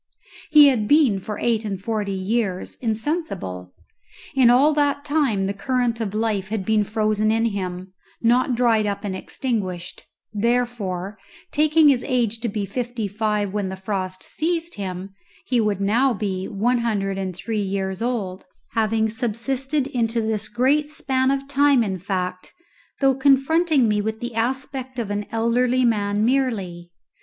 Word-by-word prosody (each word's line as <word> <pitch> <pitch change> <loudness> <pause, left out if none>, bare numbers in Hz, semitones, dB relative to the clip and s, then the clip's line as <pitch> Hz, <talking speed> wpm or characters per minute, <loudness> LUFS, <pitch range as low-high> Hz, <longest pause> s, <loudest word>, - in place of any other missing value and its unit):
He 300 -2 +8
had 225 -6 0
been 280 -9 +4
for 210 +2 -6
eight 230 -1 0
and 200 -3 -3
forty 210 0 -2
years 195 0 -2
insensible; 220 - -3 0.6
in 255 -3 +5
all 275 +5 +5
that 285 -1 +1
time 280 -10 +1
the 195 - -1
current 240 +2 -1
of 210 -2 -3
life 215 -4 -1
had 210 -3 -3
been 215 0 +3
frozen 215 0 0
in 225 +1 +2
him, 185 -3 -4 0.3
not 245 +2 +2
dried 230 -3 +3
up 200 +1 -3
and 195 -2 -3
extinguished; 190 -6 -4 0.3
therefore, 210 -4 -1 0.3
taking 305 +1 +4
his 255 -3 +2
age 230 -3 0
to 230 0 -2
be 205 -1 -2
fifty 235 +1 -3
five 210 -1 -1
when 205 -2 -1
the 190 - -5
frost 190 -1 -4
seized 335 +1 -2
him, 190 -1 -5 0.3
he 245 -2 +2
would 210 -3 0
now 235 +6 +2
be 190 -2 -3
one 235 +5 +1
hundred 200 -4 -1
and 185 -2 -3
three 215 +3 -3
years 190 -1 -3
old, 210 -6 -2 0.3
having 220 0 +1
subsisted 255 +5 -2
into 235 -3 -1
this 220 -1 -2
great 275 +7 +2
span 265 -3 0
of 275 0 -1
time 280 -2 +4
in 190 -3 -3
fact, 180 -1 -4 0.5
though 270 -1 +5
confronting 275 +1 +3
me 210 -1 +1
with 220 +1 -3
the 240 0 -5
aspect 260 +2 -3
of 225 -4 -3
an 205 0 -3
elderly 245 +3 +2
man 205 -2 +1
merely. 210 -10 -1
225 Hz, 155 wpm, -22 LUFS, 200-255 Hz, 0.6 s, He